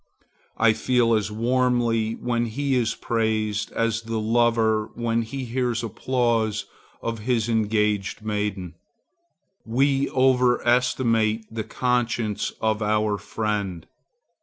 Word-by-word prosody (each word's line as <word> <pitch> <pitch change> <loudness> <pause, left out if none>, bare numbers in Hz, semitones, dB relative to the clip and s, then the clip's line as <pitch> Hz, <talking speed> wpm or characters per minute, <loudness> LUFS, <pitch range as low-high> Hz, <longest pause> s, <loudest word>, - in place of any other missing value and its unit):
I 110 -1 +4
feel 120 0 +2
as 105 -2 +1
warmly 115 -1 +1
when 120 0 -1
he 140 +5 -2
is 115 -3 +1
praised, 110 -2 -1
as 115 -1 0
the 115 0 -3
lover 110 -1 +2
when 115 -1 0
he 130 +4 -5
hears 120 -1 -1
applause 115 -2 0 0.4
of 115 -1 -3
his 115 0 0
engaged 105 -3 0
maiden. 105 -5 -2 0.9
We 135 +4 +1
over 125 -2 +2
estimate 115 -3 +2
the 110 -1 -3
conscience 120 -3 -1
of 110 0 0
our 105 -1 +1
friend. 100 -6 -3
115 Hz, 110 wpm, -24 LUFS, 110-120 Hz, 0.9 s, I